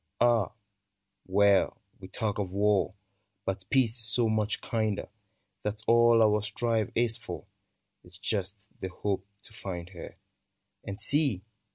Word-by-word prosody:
Ah, 120 -4 +3 0.7
well! 100 0 +4 0.2
we 95 - -9
talk 105 0 -2
of 100 -3 -1
war, 100 -1 +2 0.5
But 95 0 -3
peace 125 -3 +3
is - - +3
so 120 0 +3
much 110 -1 0
kinder, 110 -4 -1 0.5
That 105 +1 -3
all 115 0 +6
our 105 -1 +3
strife 110 +1 0
is 115 -1 +3
for - - -7 0.6
Is 90 +1 -12
just 100 0 -1 0.2
the 95 - -4
hope 95 +1 -3 0.2
to - - -9
find 90 -3 -6
her: 90 -3 -10 0.7
And 100 +1 -6
see 130 - +1
105 Hz, 140 wpm, -29 LUFS, 95-115 Hz, 0.7 s, all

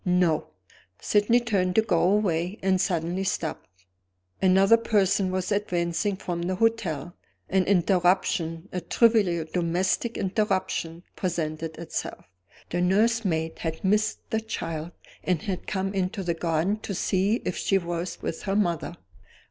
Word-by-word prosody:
"No!" 180 -4 +2 0.5
Sydney 210 +3 +3
turned 195 -6 0
to 220 - +5
go 180 -7 +2
away 185 -1 +1
and 190 -1 +3
suddenly 175 +1 -1
stopped. 165 -4 -3 0.7
Another 195 +3 +6
person 200 -4 +2
was 185 +1 -2
advancing 190 -1 0
from 175 -2 -4
the 185 +2 -1
hotel; 180 -8 0 0.4
an 190 -1 +2
interruption, 180 -2 +2
a 180 - -3
trivial 195 -5 +3
domestic 180 +6 0
interruption, 185 -4 -1
presented 160 -3 -3
itself. 170 - -5 0.5
The 175 - 0
nursemaid 190 -4 +1
had 160 -1 -4
missed 210 +3 +1
the 220 - +1
child, 165 -7 -4 0.3
and 180 -4 0
had 185 -3 -4
come 195 0 -2
into 190 +1 -1
the 175 -1 0
garden 165 +5 0
to 200 -2 -5
see 195 +4 +1
if - - -1
she 195 - +1
was 175 0 -4
with 160 - -3
her 195 - +1
mother. 175 -4 0
185 Hz, 135 wpm, -26 LUFS, 170-200 Hz, 0.7 s, Another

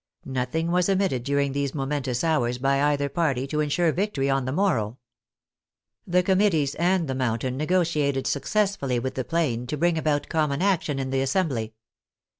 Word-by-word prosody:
Nothing 135 +6 -2
was 180 +1 +2
omitted 190 -11 +1
during 140 +1 0
these 140 0 -2
momentous 135 -3 -2
hours 125 -7 +1
by 135 +2 +1
either 140 -1 0
party 140 -4 0
to 150 +2 -3
ensure 155 +3 +2
victory 155 -7 -1
on 135 -1 0
the 130 - -2
morrow. 130 - 0 1.1
The 180 +1 +3
Committees 185 -7 +2
and 175 0 +1
the 135 - -2
Mountain 125 0 -1
negotiated 155 -3 0
successfully 145 - 0
with 130 +2 -2
the 130 - -2
Plain 125 -6 -1
to 150 - -3
bring 170 +1 +2
about 150 -2 0
common 150 -3 0
action 180 -7 +1
in 135 -1 -3
the 135 0 +1
Assembly. 130 - -1
140 Hz, 165 wpm, -25 LUFS, 130-170 Hz, 1.1 s, The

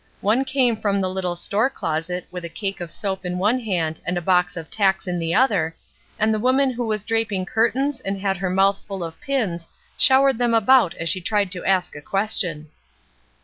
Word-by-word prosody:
One 230 +7 +2
came 260 -4 +1
from 200 -2 0
the 190 - 0
httle 185 -2 -3
store 215 +8 0
closet 175 - -3
with 180 -1 -6
a 170 - -5
cake 195 +2 -4
of 175 - -5
soap 190 +2 -4
in 180 0 -3
one 210 +7 +2
hand 175 -9 -2
and 180 - -2
a - - +1
box 180 0 +1
of 165 -1 -8
tacks 195 -3 +1
in 180 -1 -2
the 165 0 -1
other, 200 -10 +2 0.4
and 220 +1 +2
the 215 - 0
woman 260 +3 +2
who 240 -1 -3
was 215 -2 -1
draping 225 -4 -1
curtains 250 +6 0
and 195 -4 -4
had 195 -1 -1
her 185 0 -2
mouth 195 +2 +2
full 195 -3 -4
of 165 -1 -8
pins 200 -12 -2 0.3
showered 265 -2 +5
them 240 -1 +2
about 225 -4 +4
as 165 - -4
she 185 +3 0
tried 205 0 0
to 180 -2 -5
ask 190 -4 +1
a 145 - -8
question. 180 -5 -1
195 Hz, 210 wpm, -22 LUFS, 180-225 Hz, 0.4 s, showered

